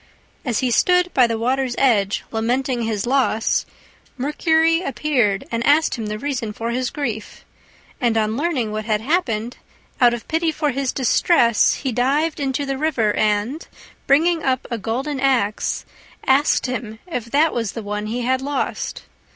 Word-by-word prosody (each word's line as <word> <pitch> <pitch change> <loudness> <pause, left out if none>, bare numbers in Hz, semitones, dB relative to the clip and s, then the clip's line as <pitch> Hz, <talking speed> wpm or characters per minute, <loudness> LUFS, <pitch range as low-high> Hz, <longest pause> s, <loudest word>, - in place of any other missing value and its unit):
As 245 -4 -1
he 255 -2 +1
stood 360 +7 +3
by 250 -3 +5
the 230 -1 -2
water's 255 +2 0
edge 210 -7 +2
lamenting 245 +3 -1
his 220 -3 -2
loss, 250 -4 +1 0.5
Mercury 320 +4 +2
appeared 260 - 0
and 230 0 -1
asked 300 +4 +3
him 225 -4 -4
the 210 0 -3
reason 250 -4 -3
for 230 +2 -3
his 250 0 -1
grief; 235 -7 -5 0.6
and 235 -2 +2
on 215 0 +1
learning 270 -6 -1
what 215 0 -4
had 215 -1 +1
happened, 245 -6 -1 0.4
out 240 -1 +5
of 235 - -10
pity 325 0 +1
for 300 -1 -1
his 270 0 -1
distress 240 - +3
he 265 - -3
dived 280 +7 +1
into 275 0 -1
the 270 -1 -3
river 240 -9 +1
and, 215 +8 0 0.4
bringing 325 +4 +3
up 260 -3 -1
a 235 - -2
golden 260 +7 -3
axe, 250 -6 0 0.4
asked 270 +2 +3
him 245 -4 -4
if 250 -11 -4
that 290 +7 +2
was 230 -4 -2
the 230 - -6
one 210 +1 -4
he 240 +3 -3
had 260 +2 0
lost. 280 +1 -3
250 Hz, 165 wpm, -21 LUFS, 225-285 Hz, 0.6 s, by